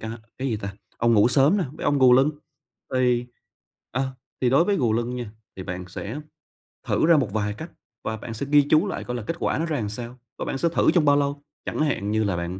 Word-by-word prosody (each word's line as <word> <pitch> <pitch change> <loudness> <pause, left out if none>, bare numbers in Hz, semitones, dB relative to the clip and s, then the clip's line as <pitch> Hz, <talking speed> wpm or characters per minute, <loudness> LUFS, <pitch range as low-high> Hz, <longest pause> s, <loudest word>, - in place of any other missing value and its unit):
ca 110 - -5 0.3
cái 135 +1 -1
gì 110 - 0
ta? 100 -1 -6 0.2
Ông 120 0 +3
ngủ 105 +2 +5
sớm 140 +9 +4
nè 185 - +1
với 155 - -8
ông 145 -1 +2
gù 130 -2 +7
lưng. 135 +4 +5 0.6
Thì, 125 -1 +2 0.7
ờ, 135 +3 0 0.4
thì 125 - +2
đối 140 +6 +5
với 200 +1 +1
gù 120 - +2
lưng 120 +2 -1
nha 120 -4 -5 0.3
thì 95 - -5
bạn 90 0 -5
sẽ 110 +9 -6 0.7
thử - - +2
ra 170 -2 +6
một 120 -9 0
vài 105 -1 -1
cách 160 +10 -9 0.3
và 110 - -3
bạn 115 +1 -7
sẽ 115 +5 -4
ghi 145 0 +7
chú 155 +6 +4
lại - - -4
coi 125 - -4
là 120 - -5
kết 165 - -3
quả - - 0
nó 165 - 0
ra 155 -3 -1
làm 105 -3 -2
sao 120 +3 -7 0.2
và - - -2
bạn - - -2
sẽ 170 +5 +1
thử 165 - +3
trong 170 -4 +3
bao 145 0 +5
lâu. 140 0 -1 0.2
Chẳng - - -3
hạn 125 -9 0
như 110 0 +2
là 100 -4 0
bạn 85 +2 -4
125 Hz, 255 wpm, -24 LUFS, 110-145 Hz, 0.7 s, gù